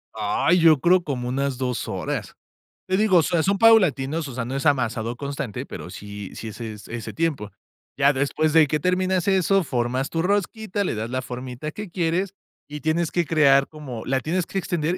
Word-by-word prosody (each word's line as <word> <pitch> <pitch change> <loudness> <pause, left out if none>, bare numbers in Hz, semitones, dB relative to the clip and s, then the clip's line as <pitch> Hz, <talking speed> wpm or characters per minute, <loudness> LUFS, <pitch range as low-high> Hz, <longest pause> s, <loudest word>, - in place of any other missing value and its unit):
Ay, 110 - +2
yo 160 -3 +6
creo 175 +4 +4
como 130 -6 -3
unas 135 +1 -1
2 125 -2 -2
horas. - - -4 0.5
Te 185 0 +1
digo, 205 -3 +4
o 165 - +5
sea, 165 0 +1
son 200 +3 +1
paulatinos, 165 -9 +4
o 135 - -8
sea, 120 -1 -3
no 130 +3 -4
es 135 - -3
amasado 120 -5 +1
constante, 140 -4 -5
pero, - - -8
sí 105 -1 -8
sí 115 - -6
es 110 - -10 0.3
ese 115 -1 -6
tiempo. 150 -11 -2 0.5
Ya 140 0 +5
después 145 +3 0
de 160 -2 +6
que 155 +2 0
terminas 185 +2 0
eso, 195 0 +3
formas 130 -1 -1
tu 165 - -1
rosquita, 205 +2 -1
le 180 - -2
das 110 +2 -4
la 130 +1 -2
formita 125 +3 -6
que 210 +3 -7
quieres, 175 +2 -1 0.3
y 150 0 -7
tienes 160 +1 0
que 175 -1 +1
crear 140 -3 +4
como 135 -7 -8
la 135 +1 +1
tienes 165 +6 -1
que - - -5
extender, 175 -2 -1
150 Hz, 195 wpm, -23 LUFS, 130-175 Hz, 0.5 s, yo